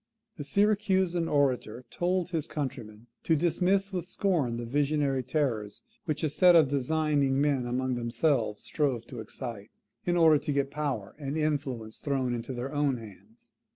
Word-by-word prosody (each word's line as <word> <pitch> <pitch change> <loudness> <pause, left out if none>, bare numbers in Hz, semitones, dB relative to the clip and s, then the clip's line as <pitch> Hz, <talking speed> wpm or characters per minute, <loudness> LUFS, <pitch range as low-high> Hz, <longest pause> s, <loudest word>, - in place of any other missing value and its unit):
The 145 - -5
Syracusan 190 0 +2
orator 130 -5 0
told 180 0 -1
his 160 -3 -2
countrymen 120 -7 -5 0.2
to 165 - +2
dismiss 185 +5 +1
with 180 -1 -3
scorn 165 -12 0
the 120 - -4
visionary 140 +1 +1
terrors 125 - -2 0.2
which 155 -3 -2
a 155 - +2
set 175 +4 +6
of 155 -5 +6
designing 140 -1 +1
men 140 -4 +1
among 130 +1 -1
themselves 120 -2 0
strove 135 -7 -1
to 120 -1 -9
excite, 110 -1 -7 0.4
in 175 0 +2
order 160 -3 +6
to 145 - -3
get 140 -1 0
power 140 -9 -3
and 140 +1 -3
influence 135 -8 -2
thrown 135 -3 -1
into 120 +2 -4
their 130 +2 -4
own 145 -3 +1
hands. 220 - -14
140 Hz, 155 wpm, -29 LUFS, 125-160 Hz, 0.4 s, set